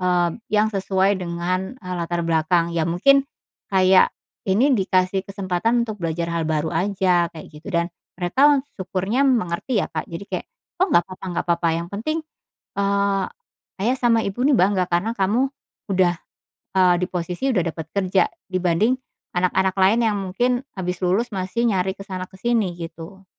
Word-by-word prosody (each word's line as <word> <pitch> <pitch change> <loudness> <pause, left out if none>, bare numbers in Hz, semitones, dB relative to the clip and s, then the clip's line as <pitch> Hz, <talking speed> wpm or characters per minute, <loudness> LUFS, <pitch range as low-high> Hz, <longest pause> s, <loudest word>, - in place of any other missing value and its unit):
mmm, 180 +1 +1
yang 215 +1 +2
sesuai 195 0 +1
dengan, 180 +5 -2
eee, 185 -7 -6
latar 170 0 -2
belakang. 165 +1 +2
Ya 165 -1 0
mungkin, 275 +11 +4 0.4
kayak 190 -1 +5 0.4
ini 250 +9 +4
dikasih 190 -3 +2
kesempatan 195 +4 0
untuk 215 -3 -7
belajar 170 0 -2
hal 165 -1 -1
baru 155 0 0
aja, 180 -1 +2
kayak 160 -1 -11
gitu. 150 +5 -11
Dan 170 +1 0 0.2
mereka 265 +11 +3 0.2
syukurnya 190 +7 -1
mengerti 230 0 0
ya - - -10
Kak 155 - -4
jadi 165 +4 -6
kayak, - - -5 0.3
"Oh 375 - +4
nggak 175 - +4
papa 185 - -10
nggak 175 - -2
papa 170 0 +2
yang 170 +1 -4
penting," 310 +10 -2 0.5
eee, 200 -1 +1 0.6
"ayah 250 +5 +1
sama 230 -2 +3
ibu 220 +6 -2
nih 290 - +4
bangga 190 -4 +3
karena 175 +6 0
kamu 220 +8 +2 0.4
udah," 185 -2 +3 0.6
eee, 180 -1 +5
"di 180 - 0
posisi 180 +8 -2
udah 190 -10 +2
dapat 160 -1 -7
kerja. 190 -1 +2 0.2
Dibanding 185 +5 +2 0.4
anak-anak 185 +1 +1
lain 195 +4 +4
yang 215 - +1
mungkin 245 +7 0 0.2
habis 180 0 -3
lulus 200 +5 +1
masih 190 +6 -1
nyari 190 -4 +1
ke 195 - -9
sana 185 -1 -5
ke 190 - -15
sini," 225 -3 +1
gitu. 165 +3 -9
190 Hz, 165 wpm, -22 LUFS, 175-210 Hz, 0.6 s, kayak